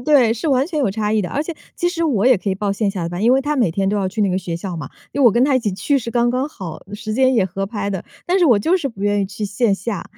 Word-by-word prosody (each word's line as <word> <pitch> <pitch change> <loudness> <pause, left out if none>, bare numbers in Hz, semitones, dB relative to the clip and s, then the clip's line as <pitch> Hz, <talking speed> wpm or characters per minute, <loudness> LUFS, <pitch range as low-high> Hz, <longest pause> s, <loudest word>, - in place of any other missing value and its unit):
对， 250 -4 +4
是 275 +8 -3
完 270 -1 +2
全 315 -3 -3
有 245 - +1
差 210 +1 -1
异 220 - +2
的。 180 - -3
而 290 - -1
且 330 +2 -6 0.2
其 350 - +1
实 340 -1 -3
我 245 -9 +2
也 255 -2 +6
可 200 - -4
以 190 - +1
报 200 +1 -1
线 200 0 0
下 190 -3 -4
的 165 - -2
班， 175 +3 -4
因 235 +3 +5
为 265 - +4
他 295 +2 -1
每 240 - +2
天 195 +3 0
都 205 - 0
要 190 -2 0
去 215 +3 -2
那 195 - +2
个 185 - 0
学 170 -3 -4
校 180 0 -5
嘛， 145 -4 -6 0.2
因 285 - -2
为 270 - +5
我 235 - +8
跟 240 +4 +3
他 280 -1 +2
一 255 - +4
起 215 -3 -1
去 275 +9 +1
是 235 -2 -5
刚 240 0 +2
刚 255 +3 -1
好， 185 - -8
时 215 +1 -5
间 260 +2 +3
也 220 - +3
合 195 +2 -3
拍 205 -1 -3
的。 190 -3 -4 0.2
但 365 +2 +2
是 360 - +4
我 235 -6 +5
就 335 - +2
是 320 -7 -2
不 200 -5 -9
愿 205 0 +2
意 195 - 0
去 205 +2 -5
线 205 +1 +1
下。 195 +2 -4
220 Hz, 370 characters per minute, -20 LUFS, 195-265 Hz, 0.2 s, 我